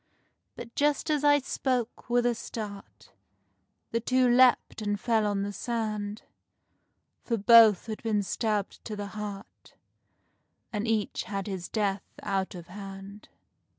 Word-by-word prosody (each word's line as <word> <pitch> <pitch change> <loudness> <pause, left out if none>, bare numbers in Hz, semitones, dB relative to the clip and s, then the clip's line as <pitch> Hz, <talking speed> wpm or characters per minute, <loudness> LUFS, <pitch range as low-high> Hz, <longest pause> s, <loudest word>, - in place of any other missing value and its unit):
But 235 - -9
just 295 +2 +1
as 295 -1 +1
I 290 0 +6
spoke, 250 -4 -2
with 240 0 +2
a 245 - +3
start, 210 -3 -8 0.8
The 230 - +1
two 255 +2 +2
leapt 245 -2 +4
and 205 -1 -1
fell 220 -2 +1
on 200 -1 0
the 205 0 -4
sand, 215 -2 -3 1.0
For 230 - -1
both 220 -1 +7
had 220 -1 -6
been 215 -3 0
stabbed 205 +2 -2
to 215 - -4
the 205 -1 -5
heart 210 -2 -8 1.0
And 210 +1 -2
each 220 -2 -1
had 195 0 -4
his 190 -4 -5
death 205 -3 -1 0.2
out 195 -1 -1
of 175 -2 -8
hand. 195 +2 -10
215 Hz, 140 wpm, -28 LUFS, 200-235 Hz, 1.0 s, both